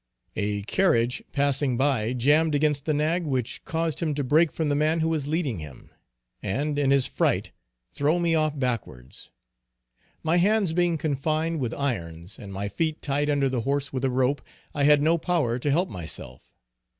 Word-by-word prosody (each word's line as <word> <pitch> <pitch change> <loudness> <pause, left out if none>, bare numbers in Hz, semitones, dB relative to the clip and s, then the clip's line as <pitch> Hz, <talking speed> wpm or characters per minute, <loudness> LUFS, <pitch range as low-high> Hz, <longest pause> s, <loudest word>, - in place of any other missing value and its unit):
A 105 -1 -2
carriage 120 - +1
passing 140 -2 +1
by 130 -4 +1
jammed 145 +5 +3
against 145 -1 +1
the 155 - +1
nag, 160 +4 +1
which 130 -3 -2
caused 165 -2 -2
him 155 -4 -1
to 145 - -1
break 155 +5 +3
from 160 - -2
the 145 - +1
man 155 +3 +1
who 160 - +1
was 155 -4 -1
leading 150 - -1
him, 75 -5 -11 0.5
and 145 +9 -1
in 140 -2 +2
his 140 -1 +4
fright - - 0 0.4
throw 150 +4 +1
me 170 -1 +1
off 155 -2 +1
backwards. 115 - -4 0.9
My 160 +2 +2
hands 200 -1 +2
being 175 -1 +2
confined 155 +2 -1
with 120 -3 -2
irons, 90 -10 -4
and 100 - -9
my 100 +1 -3
feet 155 +10 -2
tied 145 +1 0
under 140 -2 +2
the 130 -3 -1
horse 140 +2 -2
with 130 0 -3
a 135 - +2
rope, 130 +2 +1 0.3
I 140 -1 +1
had 145 0 +5
no 165 +2 +3
power 155 -9 0
to 145 - -1
help 170 +7 +2
myself. 75 -7 -7
145 Hz, 180 wpm, -25 LUFS, 125-160 Hz, 0.9 s, had